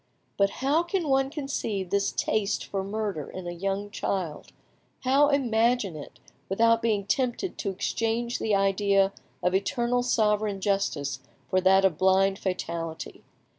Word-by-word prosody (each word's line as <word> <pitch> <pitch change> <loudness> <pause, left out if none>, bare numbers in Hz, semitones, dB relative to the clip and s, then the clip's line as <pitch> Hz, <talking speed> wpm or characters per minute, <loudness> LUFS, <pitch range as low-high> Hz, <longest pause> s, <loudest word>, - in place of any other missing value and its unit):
But 200 0 +3 0.2
how 295 +4 +4
can 345 -1 -2
one 270 0 +3
conceive 270 - -3
this 200 0 +1
taste 215 -2 -1
for 195 -1 -3
murder 200 -6 -3
in 185 -1 -7
a 175 - -3
young 195 +3 -3
child, 180 -7 -3 0.5
how 275 +3 +4
imagine 235 - +2
it, 150 - -10 0.3
without 230 +3 +3
being 215 -4 0
tempted 255 - -1
to 200 - -1
exchange 230 +5 -1
the 215 -2 +1
idea 195 0 +2 0.3
of 180 - +2
eternal 240 +5 +1
sovereign 210 -4 +1
justice 190 -8 -1 0.3
for 185 - +3
that 190 +1 +5
of 175 -5 +1
blind 190 +1 +3
fatality? 170 -3 -4
200 Hz, 140 wpm, -27 LUFS, 190-235 Hz, 0.5 s, that